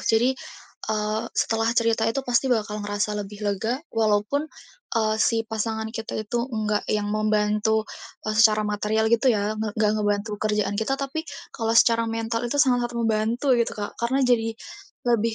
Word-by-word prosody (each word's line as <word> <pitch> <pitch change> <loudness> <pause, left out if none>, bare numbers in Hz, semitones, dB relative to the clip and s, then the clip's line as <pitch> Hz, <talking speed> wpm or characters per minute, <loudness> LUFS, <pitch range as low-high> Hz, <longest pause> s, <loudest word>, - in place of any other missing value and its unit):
Jadi, 235 +4 +3 0.6
eee, 215 0 -1
setelah 225 0 +1
cerita 225 -1 +2
itu 275 +4 -1
pasti 245 +2 +1
bakal 215 -3 0
ngerasa 205 +1 -1
lebih 205 +1 -7
lega, 205 +5 0 0.2
walaupun, 225 +7 +1 0.5
eee, 215 -1 +2
si 225 -1 +2
pasangan 220 0 -3
kita 225 -1 -5
itu 235 +4 -2
nggak 215 -3 -1
yang 210 -1 0
membantu 215 0 +1 0.5
secara 215 -1 +4
material 210 +1 0
gitu 245 +3 +4
ya, 210 -2 +1
ng 215 0 -3
nggak 215 -1 +3
ngebantu 205 +1 0
kerjaan 210 -2 0
kita, 270 +5 0
tapi 275 +3 -3 0.3
kalau 225 0 0
secara 230 0 +4
mental 225 0 -2
itu 285 - -2
sangat-sangat 245 -4 +2
membantu 230 +3 +1
gitu 235 - 0
Kak. 205 -1 -4
Karena 245 +3 +1
jadi 235 -2 +2 0.6
lebih 230 -2 +2
220 Hz, 155 wpm, -24 LUFS, 210-235 Hz, 0.6 s, secara